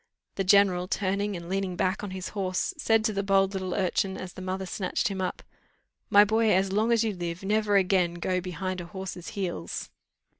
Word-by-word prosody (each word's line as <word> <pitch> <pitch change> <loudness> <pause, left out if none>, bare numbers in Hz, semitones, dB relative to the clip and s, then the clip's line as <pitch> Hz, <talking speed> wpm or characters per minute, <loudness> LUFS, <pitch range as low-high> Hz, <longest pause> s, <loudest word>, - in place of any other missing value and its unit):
The 195 - -1
general, 190 -2 +4
turning 200 +1 -1
and 170 -1 -7
leaning 190 0 -2
back 185 +3 0
on 205 - -4
his 185 0 -5
horse, 190 - -1
said 225 -7 +2
to 215 - +1
the 200 - 0
bold 195 0 +2
little 185 -2 -3
urchin 190 +1 0
as 185 -1 -7
the - - -9
mother 190 +1 -3
snatched 185 +2 -1
him 190 -1 -3
up, 185 - -3 0.7
"My 205 +1 +7
boy, 220 +1 +2
as 190 0 +1
long 215 +4 +2
as 230 -1 +4
you 220 -2 0
live 175 0 -5
never 210 +1 +1
again 185 -3 +3
go 180 +1 -1
behind 185 +1 -4
a - - -7
horse's 190 -1 -7
heels." 175 - -4
190 Hz, 200 wpm, -27 LUFS, 185-200 Hz, 0.7 s, My